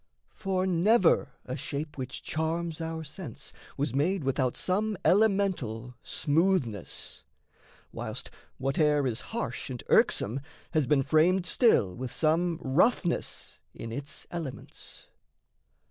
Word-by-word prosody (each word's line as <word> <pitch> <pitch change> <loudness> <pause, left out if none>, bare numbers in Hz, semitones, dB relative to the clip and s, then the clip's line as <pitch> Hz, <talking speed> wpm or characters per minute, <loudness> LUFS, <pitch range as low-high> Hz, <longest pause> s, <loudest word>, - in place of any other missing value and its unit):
For 190 -1 -1
never 190 +2 +4
a 130 - -4
shape 145 +3 -4
which 130 -1 -6
charms 165 +1 -2
our 160 0 -3
sense 150 - -8 0.2
was 140 -3 -1
made 160 +6 +1
Without 130 -2 0
some 205 +2 0
elemental 185 - +2
smoothness; 150 - 0 0.7
whilst - - -6 0.3
Whate'er 145 +2 +2
is 120 -2 -1
harsh 230 -9 -4
and 125 -2 -5
irksome 120 +7 +3 0.3
has 155 -5 +2
been 135 0 +4
framed 175 +6 +3
Still 165 - +4
with 125 +2 -5
some 165 +2 +2
roughness 170 - +1 0.2
in 115 - -6
its 140 +5 -5
elements. 165 -7 -6
155 Hz, 115 wpm, -29 LUFS, 130-180 Hz, 0.7 s, never